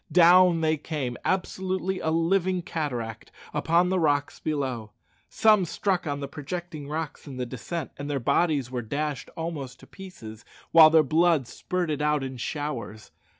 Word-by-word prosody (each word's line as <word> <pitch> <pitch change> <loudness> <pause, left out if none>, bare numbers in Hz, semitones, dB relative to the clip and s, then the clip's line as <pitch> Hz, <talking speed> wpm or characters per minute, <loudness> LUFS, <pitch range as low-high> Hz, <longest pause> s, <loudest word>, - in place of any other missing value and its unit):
Down 175 -1 +6
they 155 0 +2
came, 140 -5 -4
absolutely 185 0 -1
a 160 - -1
living 180 +2 +1
cataract, 125 -10 -4 0.2
upon 170 +4 +2
the 185 0 +1
rocks 145 -3 +1
below. 130 -8 -3 0.4
Some 215 -3 +4
struck 180 +1 -1
on 145 0 -2
the 140 - -3
projecting 155 +1 -6
rocks 155 0 -5
in 135 -2 -8
the 125 - -2
descent, 135 +6 -5
and 145 +1 -6
their 140 -1 -1
bodies 140 0 +1
were 125 -1 -2
dashed 145 +5 -3
almost 145 -6 -5
in - - -15
pieces, 115 - -11 0.3
while 160 -1 +9
their 160 0 +5
blood 160 -1 +3
spurted 170 -3 -3
out 150 -1 +1
in 130 -1 -5
showers. 120 -5 -5
155 Hz, 155 wpm, -26 LUFS, 135-175 Hz, 0.4 s, while